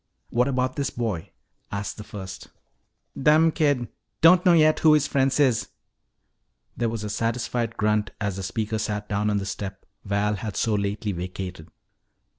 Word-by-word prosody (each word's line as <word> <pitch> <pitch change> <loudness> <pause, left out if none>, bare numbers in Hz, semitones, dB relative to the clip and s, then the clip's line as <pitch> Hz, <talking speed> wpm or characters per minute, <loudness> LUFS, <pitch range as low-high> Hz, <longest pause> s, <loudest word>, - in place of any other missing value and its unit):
"What 125 +2 +2
about 130 -1 -1
this 140 -1 0
boy?" 105 - -3 0.4
asked 100 0 -4
the 105 - -7
first. 95 -3 -8 0.7
"Dumb 155 +3 +4
kid. 145 -7 +1 0.3
Don't 175 +2 +7
know 175 - +7
yet 155 -2 +5
who 155 -1 +6
his 150 - +2
friends 135 0 +1
is." 130 -6 +3 1.1
There 120 -1 0
was 110 -1 -4
a - - -3
satisfied 115 +1 -2
grunt 105 0 +1
as 100 -3 -2
the - - -4
speaker 110 +3 -2
sat 105 -1 -3
down 105 +1 0
on 105 - +1
the 100 - -2
step 95 0 -6 0.2
Val 105 +1 0
had 105 0 -5
so 110 - +1
lately 100 +1 -1
vacated. 90 -2 -6
110 Hz, 165 wpm, -25 LUFS, 100-130 Hz, 1.1 s, Don't